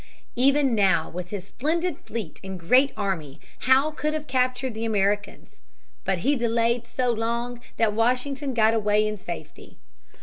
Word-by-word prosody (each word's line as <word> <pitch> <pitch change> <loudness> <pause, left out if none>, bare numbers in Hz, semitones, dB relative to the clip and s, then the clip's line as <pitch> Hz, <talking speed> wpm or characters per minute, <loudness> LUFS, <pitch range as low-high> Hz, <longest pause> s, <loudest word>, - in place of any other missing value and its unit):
Even 275 +1 +3
now 190 -7 +2
with 180 +1 -6
his 195 -2 -5
splendid 325 - -1
fleet 220 -8 -6
and 190 -1 -6
great 255 +11 +4
army 175 -9 -3 0.3
Howe 270 +4 +5
could 305 0 -2
have 305 -1 -4
captured 255 -1 0
the 220 +1 -5
Americans. 205 -2 -1 0.4
But 190 -1 +1
he 285 +2 +4
delayed 235 -1 +1
so 245 +1 0
long 235 +1 -2 0.2
that 220 -2 +2
Washington 255 +4 0
got 220 -1 +4
away 210 -1 +2
in 215 - -2
safety. 175 -4 -9
230 Hz, 155 wpm, -25 LUFS, 205-260 Hz, 0.4 s, Howe